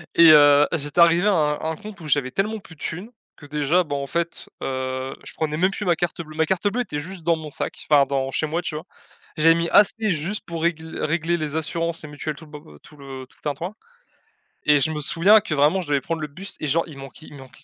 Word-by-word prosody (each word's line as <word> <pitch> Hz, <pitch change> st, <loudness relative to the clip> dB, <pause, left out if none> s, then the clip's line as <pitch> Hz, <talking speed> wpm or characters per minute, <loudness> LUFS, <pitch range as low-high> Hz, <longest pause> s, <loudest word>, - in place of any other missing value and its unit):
et 170 Hz, -, +7 dB
heu, 145 Hz, -1 st, +7 dB
j'étais 145 Hz, +1 st, -2 dB
arrivé 170 Hz, +4 st, +5 dB
à -, -, +5 dB
un 150 Hz, -5 st, +2 dB
à 160 Hz, -, -5 dB
un 160 Hz, -, -2 dB
compte 210 Hz, -4 st, -10 dB
où 155 Hz, -, -8 dB
j'avais 140 Hz, -3 st, +1 dB
tellement 215 Hz, +3 st, -1 dB
plus 165 Hz, -, -15 dB
de -, -, -22 dB
thunes, 185 Hz, +8 st, -5 dB, 0.3 s
que 145 Hz, -, -14 dB
déjà, 150 Hz, +4 st, +1 dB
bah, 145 Hz, -4 st, -4 dB
en 140 Hz, 0 st, -3 dB
fait, 170 Hz, +4 st, -3 dB
heu, 130 Hz, 0 st, -3 dB
je -, -, -10 dB
prenais 155 Hz, -1 st, -2 dB
même 185 Hz, +4 st, +2 dB
plus 205 Hz, +1 st, -5 dB
ma 175 Hz, -2 st, +3 dB
carte 175 Hz, 0 st, -2 dB
bleue. 155 Hz, -1 st, -11 dB
Ma 160 Hz, 0 st, +2 dB
carte 190 Hz, +4 st, 0 dB
bleue 245 Hz, +5 st, 0 dB
était 150 Hz, -10 st, -4 dB
juste 180 Hz, +2 st, -8 dB
dans 170 Hz, -1 st, +2 dB
mon 155 Hz, -1 st, -8 dB
sac, -, -, -6 dB
enfin, 145 Hz, -2 st, +6 dB
dans 135 Hz, -1 st, -1 dB
chez 155 Hz, -, -1 dB
moi, 165 Hz, +3 st, -2 dB
tu 155 Hz, -, -5 dB
vois? 155 Hz, +3 st, -6 dB, 0.5 s
J'avais 165 Hz, +2 st, +5 dB
mis 170 Hz, 0 st, -1 dB
assez 210 Hz, +1 st, +4 dB
juste 175 Hz, +6 st, -3 dB
pour 165 Hz, -1 st, -5 dB
régl 160 Hz, -1 st, -2 dB
régler 165 Hz, +2 st, 0 dB
les 155 Hz, -1 st, -4 dB
assurances 165 Hz, +1 st, -2 dB
et -, -, -7 dB
mutuelles 150 Hz, 0 st, -5 dB
tout 160 Hz, -, -13 dB
le 150 Hz, -, -18 dB
bo 145 Hz, -, -12 dB
heu, -, -, -17 dB
tout 150 Hz, -, -16 dB
le 135 Hz, -2 st, -9 dB
tout -, -, -25 dB
le -, -, -30 dB
tintouin 160 Hz, +7 st, -3 dB, 0.9 s
et 150 Hz, -1 st, +5 dB
je 150 Hz, +4 st, +2 dB
me 150 Hz, -, -3 dB
souviens 190 Hz, +8 st, +5 dB
que 210 Hz, -, -4 dB
vraiment 150 Hz, +7 st, +3 dB
je 165 Hz, -, -9 dB
devais 140 Hz, -2 st, +2 dB
prendre 165 Hz, +3 st, -4 dB
le 150 Hz, -, -3 dB
bus 185 Hz, +8 st, -9 dB
et 155 Hz, -, -3 dB
genre, 165 Hz, +4 st, +2 dB
il 150 Hz, -, -11 dB
manquait 135 Hz, +3 st, -11 dB
il -, -, -12 dB
manquait 130 Hz, -1 st, -15 dB
160 Hz, 270 wpm, -23 LUFS, 145-170 Hz, 0.9 s, et